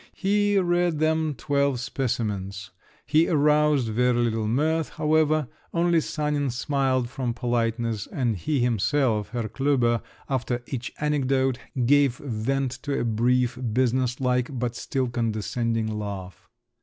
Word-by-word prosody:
He 205 Hz, +1 st, +2 dB
read 175 Hz, -3 st, +2 dB
them 155 Hz, -1 st, +1 dB
twelve 140 Hz, +1 st, 0 dB
specimens; 105 Hz, -6 st, -3 dB, 0.3 s
he 155 Hz, +2 st, +3 dB
aroused 150 Hz, -4 st, +3 dB
very 125 Hz, +2 st, +2 dB
little 115 Hz, -2 st, 0 dB
mirth, 155 Hz, +7 st, +1 dB
however; 155 Hz, -1 st, +2 dB, 0.3 s
only 170 Hz, -1 st, +3 dB
Sanin 150 Hz, -2 st, -1 dB
smiled, 130 Hz, 0 st, 0 dB
from 125 Hz, -2 st, -3 dB
politeness, 115 Hz, -2 st, -1 dB
and 120 Hz, -5 st, -1 dB
he 135 Hz, -, -1 dB
himself, 115 Hz, -1 st, +1 dB
Herr 120 Hz, -3 st, -3 dB
Klüber, 125 Hz, -3 st, +1 dB, 0.3 s
after 125 Hz, -2 st, -2 dB
each 125 Hz, -2 st, -5 dB
anecdote, 135 Hz, -3 st, +1 dB, 0.3 s
gave 140 Hz, -1 st, +4 dB
vent 135 Hz, +1 st, -2 dB
to 145 Hz, -2 st, -2 dB
a -, -, 0 dB
brief, 125 Hz, +2 st, +1 dB
business 125 Hz, 0 st, +1 dB
like, 125 Hz, +1 st, 0 dB
but 120 Hz, 0 st, -2 dB
still 130 Hz, +1 st, -2 dB
condescending 115 Hz, 0 st, -1 dB
laugh. 100 Hz, -4 st, -6 dB
125 Hz, 125 wpm, -25 LUFS, 115-145 Hz, 0.3 s, gave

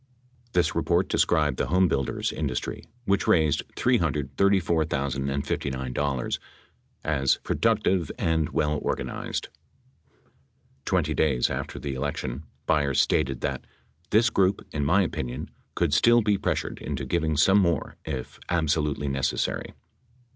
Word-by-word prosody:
This 90 Hz, -1 st, +2 dB
report -, -, +1 dB
described 75 Hz, -6 st, +2 dB
the -, -, 0 dB
homebuilders 85 Hz, -7 st, +1 dB
industry, 70 Hz, -5 st, -3 dB, 0.2 s
which 100 Hz, 0 st, +1 dB
raised 75 Hz, -3 st, +3 dB
$334, 70 Hz, -4 st, +1 dB
059, 65 Hz, -1 st, -2 dB, 0.7 s
as 70 Hz, -3 st, +2 dB
"productive 105 Hz, -7 st, +1 dB
and 80 Hz, -2 st, +1 dB
well 75 Hz, 0 st, 0 dB
organized." -, -, -3 dB, 1.4 s
Twenty -, -, +1 dB
days 65 Hz, -6 st, +2 dB
after -, -, -4 dB
the 70 Hz, -2 st, -4 dB
elec 70 Hz, +2 st, -2 dB
tion, 65 Hz, +5 st, -5 dB, 0.2 s
Byers 70 Hz, -3 st, +2 dB
stated 65 Hz, -1 st, +1 dB
that: -, -, -3 dB, 0.4 s
"This 110 Hz, +1 st, +4 dB
group, 95 Hz, 0 st, +2 dB
in 75 Hz, -, -2 dB
my 90 Hz, +8 st, +4 dB
opinion, 65 Hz, -7 st, -4 dB, 0.2 s
could 85 Hz, -4 st, +1 dB
still 120 Hz, +8 st, +5 dB
be 105 Hz, -1 st, +3 dB
pressured -, -, -2 dB
into 70 Hz, -2 st, -4 dB
giving 80 Hz, +2 st, 0 dB
some 95 Hz, +7 st, +5 dB
more 85 Hz, -6 st, 0 dB
if 65 Hz, -5 st, -5 dB
absolutely 75 Hz, -4 st, 0 dB
necessary." 70 Hz, -1 st, -1 dB
75 Hz, 120 wpm, -26 LUFS, 70-85 Hz, 1.4 s, still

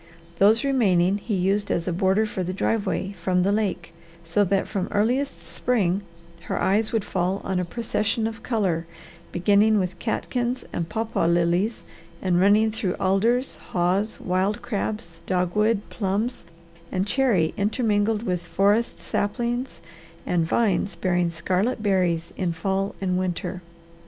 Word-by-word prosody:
Those 215 Hz, +5 st, +5 dB
remaining 200 Hz, -8 st, +3 dB
he 210 Hz, 0 st, -2 dB
used 195 Hz, +3 st, +1 dB
as 170 Hz, -, -1 dB
a 180 Hz, -, 0 dB
border 190 Hz, +4 st, +2 dB
for 210 Hz, -3 st, -4 dB
the 185 Hz, +1 st, -3 dB
driveway 200 Hz, -2 st, -1 dB
from 180 Hz, +1 st, +2 dB
the 195 Hz, -, +2 dB
lake, 205 Hz, -5 st, -1 dB, 0.3 s
so 170 Hz, +5 st, +2 dB
that 195 Hz, +1 st, +1 dB
from 195 Hz, -3 st, -2 dB
earliest 250 Hz, +7 st, 0 dB
spring 200 Hz, -6 st, 0 dB, 0.4 s
her -, -, -2 dB
eyes 210 Hz, +3 st, +2 dB
would 225 Hz, -3 st, 0 dB
fall 185 Hz, +2 st, -1 dB
on 190 Hz, -1 st, -1 dB
a 180 Hz, -, -1 dB
procession 220 Hz, +2 st, -1 dB
of 225 Hz, 0 st, -4 dB
colour 185 Hz, -9 st, -1 dB, 0.4 s
beginning 205 Hz, +4 st, +4 dB
with 185 Hz, -2 st, -2 dB
catkins 245 Hz, +2 st, -2 dB
and 165 Hz, -1 st, -2 dB
papaw 220 Hz, -5 st, -1 dB
lilies, 175 Hz, +6 st, +1 dB, 0.4 s
and 180 Hz, -1 st, +2 dB
running 210 Hz, +3 st, +4 dB
through 200 Hz, -4 st, -2 dB
alders, 230 Hz, +7 st, +1 dB
haws, 185 Hz, +4 st, -1 dB
wild 190 Hz, +4 st, 0 dB
crabs, 210 Hz, -7 st, -3 dB
dogwood, 200 Hz, +4 st, +1 dB
plums, 210 Hz, +2 st, -2 dB, 0.5 s
and 185 Hz, 0 st, 0 dB
cherry 205 Hz, -, +2 dB
intermingled 215 Hz, 0 st, +1 dB
with 180 Hz, -5 st, -1 dB
forest 200 Hz, +6 st, +1 dB
saplings 240 Hz, +4 st, -2 dB, 0.4 s
and 170 Hz, -2 st, +1 dB
vines 200 Hz, -2 st, +1 dB
bearing 180 Hz, -1 st, +1 dB
scarlet 185 Hz, +8 st, -1 dB
berries 180 Hz, -5 st, +1 dB
in 180 Hz, -3 st, -1 dB
fall 195 Hz, +4 st, -1 dB
and 185 Hz, -1 st, 0 dB
winter. 180 Hz, 0 st, -3 dB
195 Hz, 140 wpm, -24 LUFS, 180-220 Hz, 0.5 s, Those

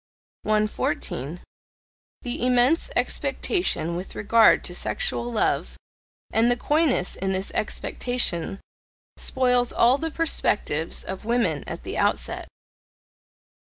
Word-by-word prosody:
114. 180 Hz, -7 st, -2 dB, 0.8 s
The 245 Hz, -2 st, -3 dB
immense 250 Hz, +5 st, +3 dB
expectation 170 Hz, -, 0 dB
with 180 Hz, +2 st, -7 dB
regard 225 Hz, +2 st, +4 dB
to -, -, -2 dB
sexual 240 Hz, -, -1 dB
love, 225 Hz, -, 0 dB, 0.5 s
and 225 Hz, +2 st, +3 dB
the 245 Hz, -, +2 dB
coyness 295 Hz, -, +1 dB
in 190 Hz, 0 st, -2 dB
this 190 Hz, +1 st, -2 dB
expectation, 210 Hz, -6 st, -1 dB, 0.6 s
spoils 250 Hz, -2 st, +1 dB
all 245 Hz, +4 st, +4 dB
the 325 Hz, -, -2 dB
perspectives 205 Hz, -, 0 dB
of 190 Hz, 0 st, -6 dB
women 235 Hz, +2 st, 0 dB
at -, -, -6 dB
the -, -, -4 dB
outset. -, -, 0 dB
235 Hz, 105 wpm, -24 LUFS, 190-250 Hz, 0.8 s, regard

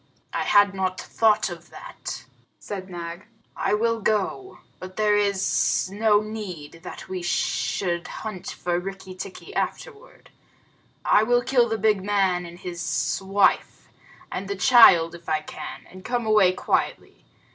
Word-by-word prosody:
"I -, -, -1 dB
had 205 Hz, -1 st, +5 dB
not 185 Hz, -1 st, -2 dB
thought 215 Hz, -1 st, +2 dB
of 170 Hz, 0 st, -10 dB
that," -, -, -8 dB, 0.3 s
said 190 Hz, -2 st, -7 dB
Nag. 170 Hz, +1 st, -7 dB, 0.3 s
"I -, -, +1 dB
will 230 Hz, +1 st, +1 dB
go, 215 Hz, -, -1 dB, 0.2 s
but 185 Hz, 0 st, -9 dB
there 210 Hz, -1 st, +3 dB
is 200 Hz, -2 st, +1 dB
no 210 Hz, 0 st, +3 dB
need 185 Hz, -8 st, -7 dB
that 180 Hz, -, -9 dB
we 185 Hz, -1 st, -4 dB
should 175 Hz, 0 st, -1 dB
hunt 215 Hz, -5 st, -6 dB
for 175 Hz, 0 st, -2 dB
Rikki 190 Hz, 0 st, -7 dB
tikki 190 Hz, -, -9 dB
afterward. -, -, -5 dB, 0.7 s
I -, -, +5 dB
will 245 Hz, +2 st, +2 dB
kill 245 Hz, -2 st, +3 dB
the 225 Hz, -, -1 dB
big 210 Hz, -2 st, +2 dB
man 190 Hz, -3 st, +1 dB
and 170 Hz, +1 st, -11 dB
his 170 Hz, -2 st, -2 dB
wife, 195 Hz, +1 st, +1 dB, 0.4 s
and 195 Hz, -, -4 dB
the 200 Hz, -, -3 dB
child 180 Hz, -5 st, +7 dB
if 170 Hz, -1 st, -10 dB
I 155 Hz, -1 st, +1 dB
can, -, -, -8 dB
and 185 Hz, 0 st, -13 dB
come 245 Hz, +1 st, -2 dB
away 210 Hz, -4 st, +5 dB
quietly. -, -, -2 dB
195 Hz, 145 wpm, -24 LUFS, 180-215 Hz, 0.7 s, child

